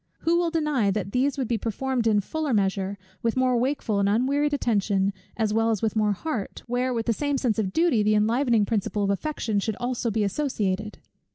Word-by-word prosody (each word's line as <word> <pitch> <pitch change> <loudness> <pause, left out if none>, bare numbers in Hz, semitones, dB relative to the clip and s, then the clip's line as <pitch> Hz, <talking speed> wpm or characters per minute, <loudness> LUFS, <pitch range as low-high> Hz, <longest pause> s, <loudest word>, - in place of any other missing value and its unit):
Who 340 +1 +2
will 345 -1 +1
deny 300 -10 +1
that 195 -1 -2
these 265 +4 +1
would 260 -3 -1
be 230 -1 0
performed 240 +2 -1
in 210 -2 +3
fuller 300 +3 -2
measure, 195 0 0 0.2
with 230 +1 0
more 255 -1 +3
wakeful 240 -4 0
and 200 0 +2
unwearied 275 +7 +1
attention, 200 -7 +1 0.2
as 220 -2 0
well 225 +1 +2
as 220 -3 -1
with 220 0 0
more 210 -1 +2
heart; 225 -2 -4
where 245 +1 -1
with 230 -2 -2
the 235 - +2
same 285 +4 -1
sense 235 -5 0
of 195 -3 -1
duty 325 - +2
the 215 +1 +3
enlivening 230 +1 +2
principle 210 -1 -1
of 200 - +1
affection 220 -2 -1
should 220 +2 -1
be 245 - -9
also 245 -1 -1
associated? 210 -2 -1
225 Hz, 205 wpm, -25 LUFS, 205-265 Hz, 0.2 s, in